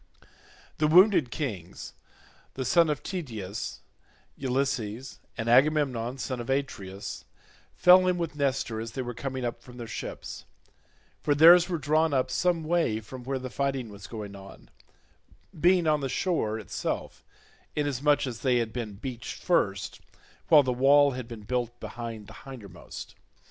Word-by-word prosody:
The 155 Hz, -, +3 dB
wounded 180 Hz, -, +6 dB
kings, 105 Hz, -, -5 dB, 0.6 s
the 130 Hz, -, -3 dB
son 170 Hz, +4 st, +4 dB
of 150 Hz, -2 st, -2 dB
Tydeus, 110 Hz, -, -5 dB, 0.5 s
Ulysses, 130 Hz, -2 st, -2 dB, 0.2 s
and 115 Hz, -1 st, -3 dB
Agamemnon 130 Hz, -2 st, +3 dB
son 130 Hz, -1 st, -4 dB
of 120 Hz, -, -6 dB
Atreus, 100 Hz, -8 st, -3 dB, 0.5 s
fell 185 Hz, +1 st, +7 dB
in 180 Hz, -1 st, +2 dB
with 165 Hz, -4 st, -3 dB
Nestor 135 Hz, -6 st, -1 dB
as 115 Hz, 0 st, -7 dB
they 130 Hz, -, -3 dB
were 120 Hz, 0 st, -5 dB
coming 130 Hz, +1 st, -4 dB
up 120 Hz, -, -4 dB
from 125 Hz, -1 st, -13 dB
their 120 Hz, -, -6 dB
ships—for 145 Hz, +5 st, -7 dB
theirs 170 Hz, +4 st, +8 dB
were 175 Hz, -, 0 dB
drawn 155 Hz, +1 st, +2 dB
up 130 Hz, -, +1 dB
some 175 Hz, -2 st, +1 dB
way 160 Hz, -9 st, +1 dB
from 125 Hz, +4 st, -10 dB
where 135 Hz, +2 st, -2 dB
the 130 Hz, -1 st, -6 dB
fighting 135 Hz, -4 st, -2 dB
was 100 Hz, -2 st, -10 dB
going 105 Hz, -3 st, -7 dB
on, 95 Hz, 0 st, -13 dB, 0.9 s
being 175 Hz, +1 st, +4 dB
on 150 Hz, -1 st, +2 dB
the 135 Hz, -, -2 dB
shore 125 Hz, -, 0 dB
itself 110 Hz, -, -4 dB, 0.5 s
inasmuch 145 Hz, 0 st, +1 dB
as 120 Hz, -4 st, -5 dB
they 130 Hz, 0 st, +2 dB
had 115 Hz, -2 st, -1 dB
been 115 Hz, -4 st, -4 dB
beached 120 Hz, +3 st, -7 dB
first, -, -, 0 dB, 0.5 s
while 150 Hz, -3 st, +7 dB
the 130 Hz, -1 st, 0 dB
wall 140 Hz, +3 st, +5 dB
had 125 Hz, -2 st, -6 dB
been 115 Hz, -3 st, -9 dB
built 120 Hz, +1 st, -2 dB
behind 115 Hz, -3 st, -7 dB
the -, -, -12 dB
hindermost. 110 Hz, -10 st, -10 dB
130 Hz, 150 wpm, -28 LUFS, 115-150 Hz, 0.9 s, theirs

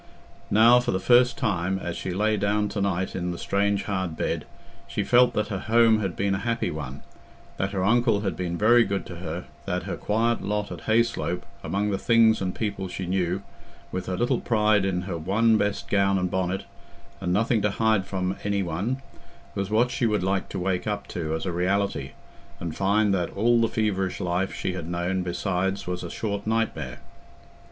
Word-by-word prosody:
Now 115 Hz, +3 st, +6 dB
for 125 Hz, -, -3 dB
the 95 Hz, -, +1 dB
first 125 Hz, +4 st, +4 dB
time, 95 Hz, -6 st, 0 dB
as 85 Hz, -2 st, -4 dB
she -, -, -4 dB
lay 105 Hz, +4 st, +1 dB
down 105 Hz, 0 st, +1 dB
to 100 Hz, -, -3 dB
night 95 Hz, -1 st, -1 dB
in 90 Hz, -1 st, -2 dB
the 85 Hz, -, -4 dB
strange 100 Hz, +1 st, 0 dB
hard 95 Hz, -5 st, -2 dB
bed, -, -, -2 dB, 0.4 s
she -, -, -2 dB
felt 125 Hz, 0 st, +4 dB
that 105 Hz, -, 0 dB
her 100 Hz, -3 st, -2 dB
home 115 Hz, +1 st, +4 dB
had 95 Hz, -5 st, -2 dB
been 100 Hz, 0 st, 0 dB
a 95 Hz, -, -1 dB
happy 115 Hz, +2 st, -1 dB
one, 70 Hz, -3 st, -6 dB, 0.5 s
that 95 Hz, -, 0 dB
her 95 Hz, -2 st, -2 dB
uncle 115 Hz, 0 st, +3 dB
had 100 Hz, -2 st, -2 dB
been 85 Hz, -1 st, -3 dB
very 120 Hz, +4 st, +6 dB
good 100 Hz, -2 st, -2 dB
to 85 Hz, -, -8 dB
her, 85 Hz, 0 st, -5 dB, 0.2 s
that -, -, -2 dB
her -, -, -4 dB
quiet 115 Hz, +3 st, 0 dB
lot 105 Hz, 0 st, -2 dB
at -, -, -8 dB
Hayslope 110 Hz, -5 st, +1 dB, 0.2 s
among 105 Hz, +1 st, -1 dB
the 95 Hz, -, -1 dB
things 115 Hz, -2 st, +4 dB
and 95 Hz, -1 st, -2 dB
people 100 Hz, -3 st, -3 dB
she 90 Hz, +1 st, -5 dB
knew, 90 Hz, +1 st, -1 dB, 0.5 s
with 95 Hz, -, -4 dB
her 90 Hz, -1 st, -2 dB
little 120 Hz, +1 st, +1 dB
pride 105 Hz, -3 st, +3 dB
in 90 Hz, -2 st, -1 dB
her 90 Hz, -3 st, -4 dB
one 110 Hz, +7 st, +3 dB
best 105 Hz, 0 st, -1 dB
gown 100 Hz, -1 st, +2 dB
and 90 Hz, -1 st, -1 dB
bonnet, 95 Hz, 0 st, -1 dB, 0.6 s
and 90 Hz, -2 st, -2 dB
nothing 110 Hz, +3 st, +2 dB
to 105 Hz, -, +2 dB
hide 110 Hz, 0 st, +2 dB
from 95 Hz, 0 st, -2 dB
any 100 Hz, -1 st, 0 dB
one, 100 Hz, +11 st, -2 dB, 0.5 s
was 100 Hz, 0 st, -2 dB
what 120 Hz, +3 st, +2 dB
she 130 Hz, -3 st, +1 dB
would 105 Hz, -4 st, 0 dB
like 95 Hz, 0 st, 0 dB
to -, -, -5 dB
wake 90 Hz, +1 st, -1 dB
up 105 Hz, -1 st, -2 dB
to 80 Hz, -2 st, -2 dB
as 80 Hz, -, -4 dB
a 90 Hz, -, -1 dB
reality, 90 Hz, -5 st, -1 dB, 0.5 s
and 85 Hz, -2 st, -4 dB
find 100 Hz, +1 st, +2 dB
that 90 Hz, -3 st, 0 dB
all 120 Hz, +3 st, +4 dB
the 115 Hz, -, +3 dB
feverish 105 Hz, -4 st, -1 dB
life 90 Hz, 0 st, -1 dB
she 90 Hz, -, -3 dB
had 85 Hz, -3 st, -5 dB
known 90 Hz, +2 st, -1 dB
besides 90 Hz, +2 st, -1 dB
was 90 Hz, 0 st, -3 dB
a 85 Hz, -, -5 dB
short 100 Hz, 0 st, -3 dB
nightmare. 115 Hz, 0 st, -1 dB
100 Hz, 200 wpm, -25 LUFS, 90-110 Hz, 0.6 s, Now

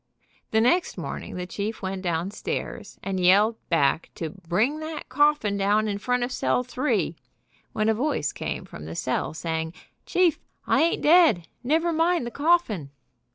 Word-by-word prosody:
The 220 Hz, -, +3 dB
next 340 Hz, +10 st, +2 dB
morning -, -, -6 dB
the 180 Hz, 0 st, -4 dB
chief 205 Hz, +4 st, -4 dB
went 190 Hz, 0 st, -3 dB
downstairs 175 Hz, +3 st, -3 dB
and 195 Hz, -1 st, -2 dB
yelled 205 Hz, +5 st, +4 dB
back 160 Hz, -1 st, +2 dB
to 160 Hz, -2 st, -4 dB
"bring 195 Hz, -, -1 dB
that 315 Hz, 0 st, -6 dB
coffin 290 Hz, -9 st, +2 dB
down 205 Hz, +2 st, +2 dB
in 200 Hz, -1 st, -2 dB
front 250 Hz, +3 st, 0 dB
of 245 Hz, -, -2 dB
cell 250 Hz, -, +1 dB
three," 255 Hz, +4 st, -1 dB, 0.6 s
when 215 Hz, 0 st, 0 dB
a 220 Hz, -, +4 dB
voice 250 Hz, -, -1 dB
came -, -, -4 dB
from 75 Hz, -, -10 dB
the 80 Hz, +1 st, -7 dB
cell 130 Hz, -, -2 dB
saying: 160 Hz, 0 st, -3 dB, 0.3 s
"Chief, 360 Hz, -3 st, +3 dB, 0.3 s
I -, -, +3 dB
ain't 335 Hz, +1 st, +1 dB
dead. 305 Hz, -, +5 dB, 0.2 s
Never 325 Hz, +6 st, +1 dB
mind 330 Hz, -3 st, +2 dB
the 240 Hz, -, -5 dB
coffin." 285 Hz, -, +1 dB
215 Hz, 160 wpm, -25 LUFS, 180-295 Hz, 0.6 s, dead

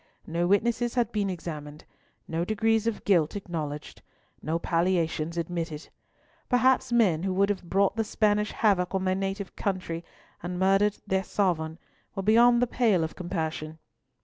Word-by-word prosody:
No 170 Hz, +1 st, -1 dB
witnesses 235 Hz, +5 st, +1 dB
had 240 Hz, -2 st, +1 dB
been 205 Hz, -2 st, 0 dB
examined, 155 Hz, -4 st, -7 dB, 0.4 s
no 165 Hz, +1 st, -1 dB
degrees 220 Hz, +3 st, +1 dB
of 230 Hz, -, -3 dB
guilt 170 Hz, -5 st, +3 dB
acknowledged, 155 Hz, -7 st, -5 dB, 0.4 s
no 160 Hz, +2 st, -1 dB
palliations 170 Hz, -1 st, 0 dB
admitted. 165 Hz, -2 st, -4 dB, 0.6 s
Perhaps 255 Hz, 0 st, +3 dB
men 205 Hz, -10 st, +3 dB
who 190 Hz, +1 st, -1 dB
would 200 Hz, +1 st, +3 dB
have 205 Hz, -2 st, -1 dB
brought 195 Hz, +1 st, +2 dB
the 225 Hz, -, +1 dB
Spanish 210 Hz, -1 st, +1 dB
havoc 195 Hz, -4 st, +1 dB
on 190 Hz, 0 st, 0 dB
their 185 Hz, -, +2 dB
native 195 Hz, 0 st, -3 dB
country, 180 Hz, -4 st, -3 dB, 0.4 s
and 175 Hz, +1 st, -4 dB
have 180 Hz, -, -4 dB
murdered 195 Hz, +2 st, +3 dB
their 190 Hz, 0 st, 0 dB
sovereign, 165 Hz, -5 st, -1 dB, 0.4 s
were 195 Hz, -, -3 dB
beyond 235 Hz, +3 st, +5 dB
the -, -, +4 dB
pale 225 Hz, -8 st, +2 dB
of 160 Hz, -, -4 dB
compassion. 160 Hz, -3 st, -4 dB
190 Hz, 155 wpm, -27 LUFS, 165-210 Hz, 0.6 s, beyond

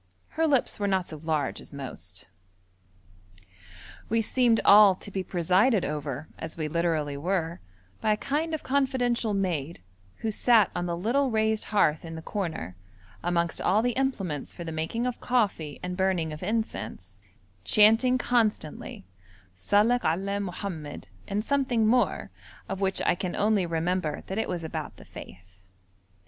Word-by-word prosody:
Her 325 Hz, +1 st, +1 dB
lips 275 Hz, -7 st, +1 dB
were 205 Hz, -, 0 dB
not 190 Hz, -2 st, +1 dB
so 155 Hz, -, -8 dB
large 155 Hz, -2 st, -2 dB
as -, -, -12 dB
most. 100 Hz, -, -8 dB, 1.8 s
We 230 Hz, +1 st, +2 dB
seemed 230 Hz, +1 st, +3 dB
all 205 Hz, -2 st, +8 dB
to 205 Hz, -, -9 dB
be 190 Hz, -, -2 dB
presided 185 Hz, +5 st, +2 dB
over, 145 Hz, -1 st, -4 dB
as 160 Hz, -, -7 dB
we 155 Hz, -2 st, -2 dB
literally 160 Hz, -3 st, 0 dB
were, 170 Hz, +1 st, -1 dB, 0.4 s
by 215 Hz, -, +3 dB
a -, -, -2 dB
kind 310 Hz, +7 st, -1 dB
of 310 Hz, -, -7 dB
confidential 250 Hz, -5 st, +1 dB
maid, 170 Hz, -5 st, -2 dB, 0.4 s
who 220 Hz, -, -1 dB
sat 220 Hz, -2 st, +4 dB
on 175 Hz, 0 st, -1 dB
the 170 Hz, 0 st, -2 dB
little 255 Hz, +9 st, +1 dB
raised 220 Hz, -1 st, +1 dB
hearth 160 Hz, -8 st, +2 dB
in 165 Hz, -1 st, -7 dB
the 160 Hz, -, -8 dB
corner, 160 Hz, -, -4 dB, 0.5 s
amongst 170 Hz, -1 st, 0 dB
all 210 Hz, +4 st, +3 dB
the 245 Hz, -, +2 dB
implements 205 Hz, -, -2 dB
for 175 Hz, -, -8 dB
the 165 Hz, -, -5 dB
making 160 Hz, +10 st, -2 dB
of 250 Hz, -1 st, -3 dB
coffee 200 Hz, -, 0 dB
and 180 Hz, 0 st, -3 dB
burning 180 Hz, -4 st, 0 dB
of 150 Hz, -, -8 dB
incense, 180 Hz, -, -4 dB, 0.4 s
chanting 225 Hz, -, +5 dB
constantly: 220 Hz, -, -1 dB, 0.5 s
'Salek 210 Hz, -, +3 dB
alleh 195 Hz, +5 st, 0 dB
Mohammed' 175 Hz, -6 st, -6 dB, 0.2 s
and 210 Hz, +2 st, -2 dB
something 265 Hz, -5 st, +1 dB
more, 245 Hz, +3 st, +1 dB, 0.4 s
of 195 Hz, 0 st, -4 dB
which 195 Hz, -1 st, +1 dB
I -, -, +4 dB
can 180 Hz, 0 st, -4 dB
only 205 Hz, -3 st, +2 dB
remember 165 Hz, -1 st, -1 dB
that 190 Hz, +3 st, -3 dB
it -, -, -1 dB
was 175 Hz, -2 st, -3 dB
about 160 Hz, -, -5 dB
the -, -, -14 dB
faith. 90 Hz, 0 st, -13 dB
190 Hz, 155 wpm, -27 LUFS, 160-225 Hz, 1.8 s, all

